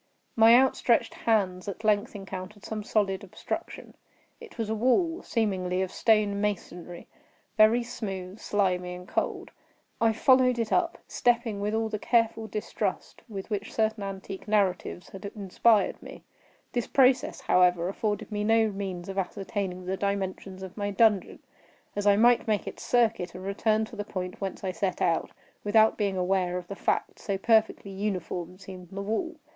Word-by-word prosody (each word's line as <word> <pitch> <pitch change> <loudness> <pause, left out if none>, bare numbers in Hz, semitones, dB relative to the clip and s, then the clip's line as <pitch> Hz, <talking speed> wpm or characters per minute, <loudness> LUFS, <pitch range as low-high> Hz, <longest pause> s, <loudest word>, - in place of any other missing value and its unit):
My 225 +1 +7
outstretched 245 -2 +3
hands 190 -5 0
at 200 +2 -6
length 210 -1 +1
encountered 195 +1 -8
some 215 -1 -4
solid 205 -2 0
obstruction. 190 - -6 0.5
It 470 -3 -13
was 225 -2 -2
a 220 - -1
wall, 290 - +2
seemingly 190 -5 0
of 185 - -4
stone 210 -3 +2
masonry—very 210 +3 -1
smooth, 195 -5 -6
slimy, 180 -3 0
and 180 0 -10
cold. - - -2 0.5
I 225 -1 +5
followed 255 +2 +4
it 230 -2 -2
up; 180 - +1
stepping 235 -4 +1
with 210 +1 -1
all 225 0 0
the 215 -1 -4
careful 230 -1 +1
distrust 215 0 -4
with 200 0 -7
which 205 0 -3
certain 220 -1 0
antique 195 0 -6
narratives 195 -4 0
had 195 - -10
inspired 210 +2 +2
me. - - -11 0.5
This 240 -2 -1
process, 260 -1 +3
however, 180 -1 +3
afforded 205 +3 -2
me 210 0 -1
no 225 0 +3
means 190 -3 -5
of 195 0 -3
ascertaining 190 -1 -4
the 190 +1 -2
dimensions 195 -1 -3
of 190 0 -8
my 205 -1 -2
dungeon; 205 -1 +2 0.6
as 205 0 -1
I 200 - +7
might 235 +3 +4
make 215 -2 +1
its - - -7
circuit, 225 -7 +1
and 185 - -8
return 215 +2 +1
to 220 - -12
the 205 - -3
point 185 -2 -6
whence 195 0 -4
I 190 - -1
set 185 0 -2
out, 165 -2 +1 0.3
without 220 +1 +4
being 200 -3 -1
aware 180 -1 +1
of 175 -1 -7
the 200 - -5
fact; - - -1
so 200 -1 -2
perfectly 220 -1 +2
uniform 185 -3 -4
seemed 185 -2 -11
the 195 +1 -5
wall. 330 - -2
205 Hz, 160 wpm, -28 LUFS, 190-220 Hz, 0.6 s, My